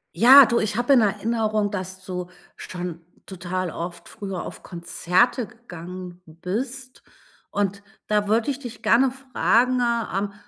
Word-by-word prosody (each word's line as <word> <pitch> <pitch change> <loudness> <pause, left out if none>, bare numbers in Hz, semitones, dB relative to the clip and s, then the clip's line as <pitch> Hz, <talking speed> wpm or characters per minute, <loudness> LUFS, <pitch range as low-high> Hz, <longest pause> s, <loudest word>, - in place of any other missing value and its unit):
Ja, 265 +3 +9
du, 235 +1 +1
ich 215 0 -2
hab 245 +2 -2
in 265 -4 +7
Erinnerung, 215 0 0
dass 190 -1 -6
du 180 -2 -5 0.3
schon 175 -2 -6 0.2
total 185 -1 -4
oft 170 +1 -7
früher 195 -3 -6
auf - - -9
Konzerte 180 +7 0
gegangen 180 -5 -10
bist 240 - -6 0.5
und 200 -1 -2 0.2
da 210 -1 +1
würde 225 +4 +1
ich 275 - -1
dich 240 -4 -9
gerne 255 +3 +4
fragen, 255 -1 +1
ähm, 215 -4 -1
205 Hz, 135 wpm, -23 LUFS, 180-240 Hz, 0.5 s, Ja